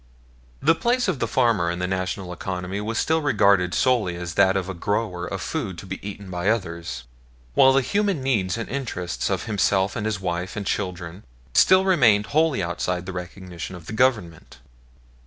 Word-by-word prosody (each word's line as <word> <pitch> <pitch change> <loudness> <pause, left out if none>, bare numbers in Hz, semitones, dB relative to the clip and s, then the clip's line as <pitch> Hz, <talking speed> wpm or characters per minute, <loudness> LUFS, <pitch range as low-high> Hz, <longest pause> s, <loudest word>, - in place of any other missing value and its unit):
The - - +6
place 240 +7 +1
of 175 -8 -1
the 115 - 0
farmer 115 -9 +2
in 85 - -2
the 90 - -1
National 95 0 -3
economy 95 +2 -4
was 115 +2 -3
still 160 0 +1
regarded 100 - +3
solely 120 -9 +2
as 85 -1 -5
that 95 +1 +4
of 95 -1 -2
a 95 - -4
grower 90 -1 -2
of 95 - -4
food 110 - -3
to 85 - -9
be 95 0 -6
eaten 100 -1 -8
by 90 +2 -1
others, 85 - -2 0.5
while 135 - +6
the 135 0 +3
human 200 -1 0
needs 105 -8 0
and 115 - -4
interests 115 -10 -3
of - - -1
himself 100 -2 +1
and 110 -2 -2
his 105 -4 -2
wife 90 0 -3
and 105 -1 -4
children 90 -2 -3 0.3
still 185 0 +5
remained 120 - +4
wholly 155 - +2
outside 90 +1 -2
the 95 - -6
recognition 90 0 -7
of 85 -2 -11
the - - -7
Government. 110 -9 0
95 Hz, 185 wpm, -24 LUFS, 90-120 Hz, 0.5 s, The